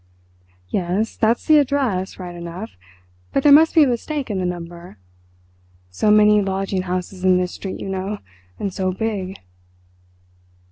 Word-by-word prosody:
"Yes, 190 +4 -1
that's 225 +1 +1
the 310 -1 +6
address, 255 -10 -1
right 180 -2 -7
enough, 170 +5 -7 0.6
but 275 - 0
there 295 - +6
must 315 +4 +6
be 320 - +8
a - - +3
mistake 255 +1 -2
in 195 - -2
the 180 - -1
number. 175 -5 -7 0.9
So 90 - 0
many 210 0 +6
lodging 195 -1 -1
houses 185 0 -4
in 185 -1 +5
this 180 0 -1
street, 190 - -6
you - - -6
know, 195 +2 -3 0.4
and 195 -2 -3
so 185 0 -1
big." 195 -1 -3
195 Hz, 150 wpm, -21 LUFS, 180-225 Hz, 0.9 s, be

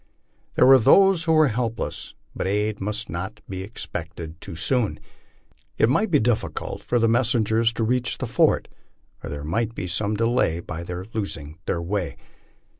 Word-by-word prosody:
There - - +5
were 135 0 +8
those 175 - +5
who 160 - +3
were 155 -3 +5
helpless, 115 0 -3 0.2
but - - -2
aid 105 +1 -1
must 105 +3 -2
not 85 +3 -5
be 95 -1 -5
expected 85 -5 -7
too - - -7
soon. 115 +6 +1 0.8
It 110 - +4
might 215 - +2
be 150 -5 +4
difficult 115 0 -1
for 120 - 0
the 115 -1 +3
messengers 115 -1 +2
to 115 - -2
reach 125 +2 0
the - - -3
fort, - - +2 0.6
or - - -5
there 70 0 -5
might 115 +9 -1
be - - -4
some 100 +5 -1
delay 115 -7 +1
by 85 0 -6
their 90 +1 -6
losing 80 -8 -5
their 85 - -1
way. 95 0 -2
110 Hz, 170 wpm, -24 LUFS, 90-120 Hz, 0.8 s, were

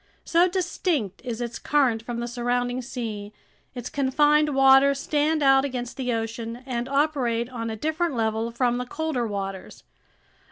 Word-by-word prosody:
So 345 +2 +4
distinct 350 - -1
is 240 -2 -4
its 235 -1 -4
current 260 -7 +2
from 235 0 -5
the 240 - -3
surrounding 245 +1 -1
sea, 220 -5 -6 0.4
its 245 -1 -5
confined 295 +2 +2
waters 270 +1 +6
stand 300 +2 +1
out 270 -1 +5
against 250 -3 -4
the 255 -2 -2
ocean 230 +1 -4
and 245 -1 -3
operate 265 -5 0
on 230 -2 -4
a 220 - -3
different 315 +5 -1
level 225 0 0
from 240 +1 0
the 250 - -4
colder 290 -5 -2
waters. 195 -2 -6
250 Hz, 155 wpm, -25 LUFS, 230-280 Hz, 0.4 s, waters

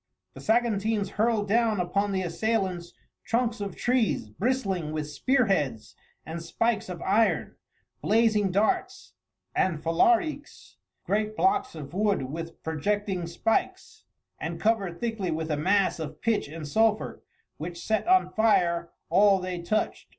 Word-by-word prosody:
The - - -11
Saguntines 220 -3 +1
hurled 215 0 +1
down 225 -1 +2
upon 200 +3 0
the 190 -1 -1
assailants 180 -1 -1 0.3
trunks 230 -1 0
of 200 -3 -4
trees 240 - 0
bristling 195 - -1
with 155 -1 -3
spearheads 195 - 0 0.3
and 165 +2 -6
spikes 215 +5 -1
of 175 -2 -6
iron, 220 +4 +1 0.5
blazing 215 -2 +3
darts 370 - 0 0.4
and 180 -4 +1
falariques 300 - 0 0.3
great 215 +1 -1
blocks 395 - +1
of 145 -1 -8
wood 205 -5 +1
with 165 +1 -7
projecting 180 +3 -1
spikes, 195 +6 -2 0.3
and - - -4
covered 200 -6 0
thickly 225 -6 -2
with 160 0 -2
a - - +2
mass 190 +5 +2
of 155 -2 -6
pitch 225 -7 0
and 155 0 -7
sulphur 220 +6 +1 0.4
which 170 +3 -6
set 220 - -1
on 370 +1 +4
fire 175 -6 +2 0.2
all 200 0 +5
they 180 -1 -4
touched. 215 +5 -2
200 Hz, 135 wpm, -27 LUFS, 170-225 Hz, 0.5 s, all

